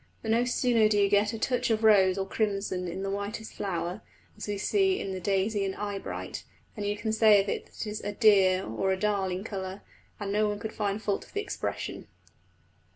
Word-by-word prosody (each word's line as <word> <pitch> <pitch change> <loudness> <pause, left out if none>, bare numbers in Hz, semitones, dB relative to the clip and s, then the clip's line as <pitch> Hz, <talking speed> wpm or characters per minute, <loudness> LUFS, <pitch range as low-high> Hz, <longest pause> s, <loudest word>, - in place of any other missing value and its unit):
But 220 - -1
no 235 +2 +3
sooner 240 -3 +3
do 210 - +2
you 200 -1 +4
get 205 +1 +3
a 225 - -4
touch 250 +1 0
of 225 -1 +1
rose 195 -3 +5
or 195 - -1
crimson 195 -3 -1
in 180 +3 -4
the 195 - -2
whitest 205 +2 -4
flower, 185 0 -3 0.3
as - - -7
we 205 -1 -2
see 385 - +2
in 195 - -4
the 185 - -4
daisy 200 +2 0
and 195 -1 -2
eyebright, 205 -1 -5 0.3
than 210 -2 -5
you 205 0 -1
can 215 +1 -2
say 220 -2 +6
of 195 - 0
it - - -3
that - - -7
it - - -7
is 210 0 -4
a 205 - -2
"dear" 195 -4 +4
or 190 - -1
a 190 - +1
"darling" 195 -2 0
colour, 190 -2 -5 0.4
and 200 -1 -3
no 210 +1 +2
one 205 - -2
can 220 +1 -5
find 210 0 -2
fault 200 -1 -1
with - - -20
the 415 - -1
expression. 425 - -4
205 Hz, 220 wpm, -28 LUFS, 195-220 Hz, 0.4 s, say